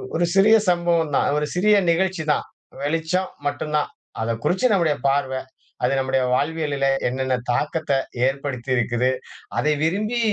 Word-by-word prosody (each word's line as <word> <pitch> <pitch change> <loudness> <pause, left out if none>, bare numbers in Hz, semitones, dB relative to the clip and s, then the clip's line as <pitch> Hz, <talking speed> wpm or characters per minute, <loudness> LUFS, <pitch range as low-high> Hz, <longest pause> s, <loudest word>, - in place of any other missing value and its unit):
ஒரு 175 - +2
சிறிய 210 +3 +6 0.2
சம்பவம் 170 -3 +1
தான். - - +2
ஒரு 150 - 0
சிறிய 210 +4 +4 0.2
நிகழ்ச்சி 180 -1 0
தான். - - +1 0.4
வெளிச்சம் 165 +5 -1 0.2
மட்டும் 150 +1 -2
தான். 150 - -1 0.3
அதை 115 +1 0
குறிச்சி 190 +8 +1
நம்முடைய 165 -6 +2
பார்வை. 135 -1 0 0.4
அது 130 +2 +2
நம்முடைய 130 0 +1
வாழ்வியல்ல 145 -2 0 0.2
என்னென்ன 130 +1 0 0.2
தாக்கத்த 155 +5 -1 0.4
ஏற்படுத்தியிருக்குது? 130 -2 -1 0.5
அதை 150 0 +2
விரும்பி 215 +8 0
150 Hz, 135 wpm, -22 LUFS, 135-175 Hz, 0.5 s, சிறிய